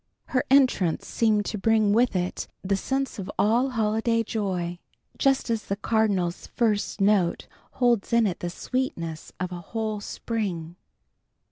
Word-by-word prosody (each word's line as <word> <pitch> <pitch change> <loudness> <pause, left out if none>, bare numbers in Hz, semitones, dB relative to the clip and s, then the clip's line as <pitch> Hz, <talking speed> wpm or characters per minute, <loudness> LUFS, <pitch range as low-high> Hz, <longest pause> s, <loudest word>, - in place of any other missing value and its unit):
Her 255 - 0
entrance 255 - +3
seemed 215 -3 +1
to 210 - -3
bring 215 0 +3
with 235 -1 +3
it 180 0 -2 0.2
the 195 +1 +1
sense 270 +5 -2
of 190 - -5
all 235 +6 +3
holiday 230 0 +1
joy, 185 -6 -2 0.4
just 270 -3 +2
as 225 -1 -1
the 200 - -1
cardinal's 200 -5 0
first 215 -3 0
note 195 -3 +2 0.3
holds 240 -5 +2
in 235 -1 +4
it 185 -4 -1
the 175 - -3
sweetness 170 -7 -3
of 185 0 -3
a 175 -1 -6
whole 220 +3 -3
spring. 190 -7 -4
215 Hz, 145 wpm, -26 LUFS, 185-230 Hz, 0.4 s, in